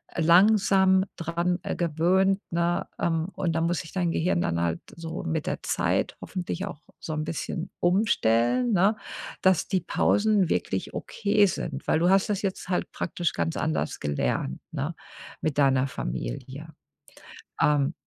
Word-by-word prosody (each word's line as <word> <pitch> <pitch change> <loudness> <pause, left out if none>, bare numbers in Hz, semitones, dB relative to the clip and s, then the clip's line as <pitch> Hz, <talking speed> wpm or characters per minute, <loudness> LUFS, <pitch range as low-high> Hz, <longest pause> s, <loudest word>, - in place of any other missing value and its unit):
langsam 190 +2 +5
dran 170 +2 -1 0.2
gewöhnt, 180 +4 +2
ne? 170 +1 0
Ähm, 165 -1 0
und 175 -4 -1
da 165 - 0
muss 170 -1 +1
sich 160 - -11
dein 180 -3 0
Gehirn 175 +1 +1
dann 85 - 0
halt 85 -1 -1
so 165 +1 -6
mit 160 -3 -2
der - - -2
Zeit - - 0
hoffentlich 185 0 -4
auch 160 -6 -8 0.2
so 155 - -5
'n 155 0 -2
bisschen 165 +2 -4
umstellen, 180 - +2
ne, 195 +3 +4 0.5
dass 190 -3 +3
die 185 - 0
Pausen 205 +1 +2
wirklich - - -2
okay 210 -1 +2
sind, 155 -5 -4
weil - - +3
du 175 +2 +3
hast 195 0 +4
das 205 -2 0
jetzt 190 -2 -3
halt 180 - -1
praktisch 175 -2 -2
ganz 80 -1 -1
anders 75 -1 -1
gelernt, 70 -2 -1
ne? 155 +2 -3 0.5
Mit 155 -3 -1
deiner 135 -2 +4
Familie. 130 - -5 0.9
Ähm 145 0 +3
170 Hz, 150 wpm, -26 LUFS, 150-190 Hz, 0.9 s, langsam